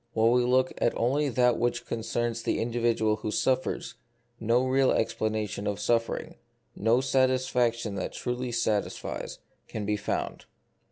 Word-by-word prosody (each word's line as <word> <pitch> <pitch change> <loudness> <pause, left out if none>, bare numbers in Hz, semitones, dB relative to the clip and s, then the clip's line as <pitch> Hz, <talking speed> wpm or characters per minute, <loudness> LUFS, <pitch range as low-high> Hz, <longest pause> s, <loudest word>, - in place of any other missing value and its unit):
While 115 +1 +4
we 125 0 +4
look 130 +1 +2 0.2
only 140 +5 +1
at 125 - -4
that 125 -1 +3
which 120 +1 0
directly - - -4
concerns 115 +1 -2
the - - -1
individual 115 -2 +1
who 110 - -4
suffers, 130 +4 0 0.5
no 120 +3 +2
real 130 0 +3
explanation 110 -2 -1
of 100 0 -2
suffering, 115 +2 -1 0.4
no 115 +4 +3
satisfac 130 -2 +2
tion 115 -3 -5
that - - -3
truly 125 0 -3
satisfies, 110 -3 -2 0.3
can 105 -2 -5
be 105 +1 0
found. 105 - -3
115 Hz, 150 wpm, -28 LUFS, 110-125 Hz, 0.5 s, While